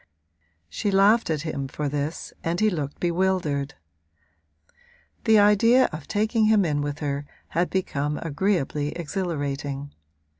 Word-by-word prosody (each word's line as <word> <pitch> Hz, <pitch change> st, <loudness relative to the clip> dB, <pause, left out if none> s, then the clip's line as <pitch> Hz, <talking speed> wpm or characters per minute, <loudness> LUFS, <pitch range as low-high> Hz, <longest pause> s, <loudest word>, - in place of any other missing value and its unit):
She 80 Hz, -, -2 dB
laughed 200 Hz, +3 st, +4 dB
at 155 Hz, -1 st, -1 dB
him 140 Hz, -4 st, -3 dB
for 150 Hz, +2 st, -3 dB
this 145 Hz, +2 st, -3 dB
and 170 Hz, +1 st, -1 dB
he 215 Hz, 0 st, +3 dB
looked 145 Hz, -5 st, -4 dB
bewildered; 170 Hz, -5 st, 0 dB, 1.5 s
the 220 Hz, -1 st, +6 dB
idea 220 Hz, +5 st, +5 dB
of 155 Hz, -1 st, -7 dB
taking 215 Hz, +1 st, +1 dB
him 215 Hz, -3 st, +4 dB
in 145 Hz, -3 st, 0 dB
with 145 Hz, 0 st, -3 dB
her 145 Hz, -1 st, -3 dB, 0.2 s
had 175 Hz, +2 st, 0 dB
become 150 Hz, -6 st, -1 dB
agreeably 150 Hz, -3 st, -1 dB
exhilarating. 145 Hz, -5 st, -3 dB
165 Hz, 125 wpm, -25 LUFS, 145-195 Hz, 1.5 s, the